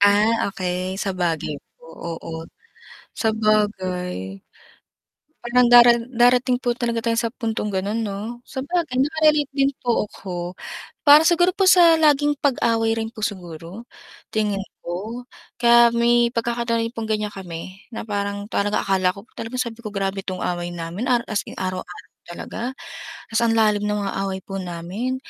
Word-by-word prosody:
Ah, 205 +2 +4
okey 185 0 -3
sabagay 175 -6 -2 0.2
po, - - -20 0.3
oo 165 - -8 0.8
sabagay. 190 - -1 1.0
Parang 245 +1 +4
dara 240 0 +9 0.2
darating 250 +1 +3
po 245 - +1
talaga 235 -1 -1
tayo 230 0 0
sa 235 - +1
puntong 225 -3 -2
gano'n 200 +4 -1
'no? 215 +2 -4
Sabagay 300 +1 -2
naka-relate 305 -1 +2
din 275 0 +1
po 240 -3 +1
ako. 180 -2 -6 0.5
Para 300 +2 +8
siguro 350 +1 +4
po 390 0 0
sa 340 -3 +7
laging 295 -1 +3
pag-away 230 -5 +1
rin 225 0 -3
po 215 -2 -2
siguro, 175 0 -8 0.5
tingin 210 -2 0 0.2
ko, 220 +8 -5 0.3
kaya 235 0 +6
may 235 0 +3
pagkakataoy' 230 0 -1
pong 220 -1 -5
ganiyan 210 -1 -1
kami, 185 +1 -8
na 225 - -6
parang 200 0 -3
parang 205 -1 -1
akala 190 -2 +2
ko 200 +3 -10
po - - -34
talaga 230 +3 -6
sabi 235 -2 -3
ko 215 - -5
grabe 195 -1 -2
'tong 185 -2 -5
away 175 0 -2
namin, 175 +8 -4
araw 240 -1 +2
as 215 -2 -1
in - - -11
araw-araw 185 -1 -5 0.2
talaga, 225 +7 -5 0.6
ta's 220 - +2
ang 230 -1 +2
lalim 210 -2 +3
ng 210 - 0
mga 200 -1 -2
away 190 -1 -3
po 195 -1 -5
namin, 185 +8 -4
220 Hz, 150 wpm, -22 LUFS, 190-240 Hz, 1.0 s, dara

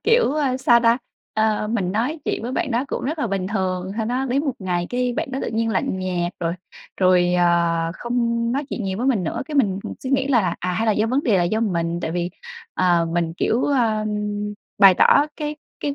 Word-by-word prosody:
kiểu, 460 - +3
a, 275 -4 +1
sao 240 -2 +4
ta, 230 +1 +4 0.4
ờ, 215 -1 +1
mình 190 -5 -1
nói 250 +9 -1
chuyện - - -2
với 245 +2 -4
bạn 270 - -1
đó 240 +4 0
cũng - - -3
rất 305 +4 -2
là 290 - 0
bình 195 -2 -2
thường. 190 -2 -2
Sau 220 -1 -1
đó 255 +3 -1
đến 275 +4 0
một 275 - 0
ngày 175 -2 -2
cái 250 0 0
bạn 265 - -3
đó 265 - -3
tự - - -2
nhiên 225 +1 0
lạnh 190 -1 -1
nhạt, 180 -1 -2
rồi 165 0 0 0.5
rồi, 180 -1 +4
ờ, 170 -1 +2
không 235 0 -1
nói 280 +2 -1
chuyện 220 - -3
nhiều 190 +1 -3
với 250 - -1
mình 220 -10 +2
nữa, - - -2
cái 305 - -6
mình, 200 -9 +2
ừm, - - -5
suy 260 - -4
nghĩ 270 0 +2
lại 240 -6 +4
là, 175 -2 0
à 180 0 -2
"Hay 220 +5 -1
là 215 - +4
do 215 +2 +1
vấn 260 +5 +1
đề 210 -9 +3
là 175 - +2
do 215 +6 0
mình?". 170 -5 -1
Tại 160 - -3
vì, 175 +1 -2 0.4
ờ, 175 -2 +2
mình, 170 -1 0
kiểu, 235 - +1
a, 225 -6 +1 0.7
bày 195 -2 +8
tỏ 285 +10 +5
cái 300 -1 -4 0.2
cái 285 -1 -2
220 Hz, 240 wpm, -22 LUFS, 180-255 Hz, 0.7 s, bày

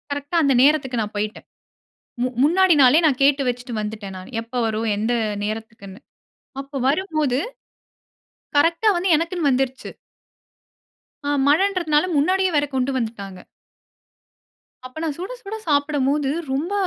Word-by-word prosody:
கரெக்டட 285 +3 -4
அந்த 280 -2 +3
நேரத்துக்கு 270 -4 +2
நான் 210 0 -5
போய்யிட்டேன். 210 +1 -4 0.8
மு 250 - +1 0.2
முன்னாடி 360 +3 +4
நாளே 260 +4 +6
நான் 280 -4 +1
கேட்டு 275 0 +4
வெச்சுட்டு 245 0 -4
வந்துவிட்டேன் 210 -2 -6
நான், 185 +7 -12
எப்போ 230 +2 -6
வரும் 220 +1 -2
எந்த 220 +4 -1 0.3
நேரத்துக்குனு. 215 -2 -7 0.6
அப்போ 275 +1 -9
வரும்போது, 305 -5 0 1.2
கரெக்டா 335 +8 +3
வந்து 355 +2 0
எனக்குனு 335 0 -1
வந்துருச்சு. 260 0 -1 1.4
ஆ - - +1 0.2
மழன்றதுனால 330 -1 +2
முன்னாடியே 370 +5 +2
வேற 290 0 +3
கொண்டு 260 +1 0
வந்துட்டாங்க. 200 -6 -5 1.5
அப்போ 255 +5 -9
நான் 310 -3 -2
சுட 370 +6 -6
சுட 420 0 -6
சாப்பிடும்போது 285 -1 +1 0.2
ரொம்ப, 305 +9 -2
280 Hz, 125 wpm, -21 LUFS, 235-315 Hz, 1.5 s, நாளே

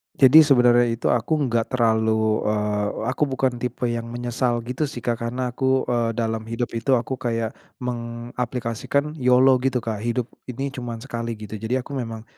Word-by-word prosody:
Jadi, 135 +4 +8
sebenernya 125 -5 +5
itu 115 0 0
aku 120 +6 +1
enggak 120 -6 0
terlalu, 110 -2 +2
eee, 105 -1 0 0.2
aku 145 +2 0
bukan 130 -2 -1
tipe 125 0 -4
yang 115 0 -3
menyesal, 120 0 -1
gitu 130 +5 -2
sih, 120 - -8
Kak. 120 -1 -1
Karena 125 +1 -2
aku, 130 +1 +1
eee, 120 -2 +1
dalam 115 -1 -1
hidup 115 +1 -3
itu 130 +3 +2
aku 125 +2 -2
kayak 115 -2 -1 0.3
mengaplikasikan 120 +3 -3
YOLO 125 +1 +5
gitu, 130 -1 +1
Kak, 110 -3 -3
hidup 120 +1 -1 0.2
ini 135 +2 -4
cuman 120 -3 -6
sekali, 115 -3 -4
gitu. 105 0 -7
Jadi, 115 +4 -1
aku 140 - -12
memang 115 -4 -4
120 Hz, 170 wpm, -23 LUFS, 115-130 Hz, 0.3 s, Jadi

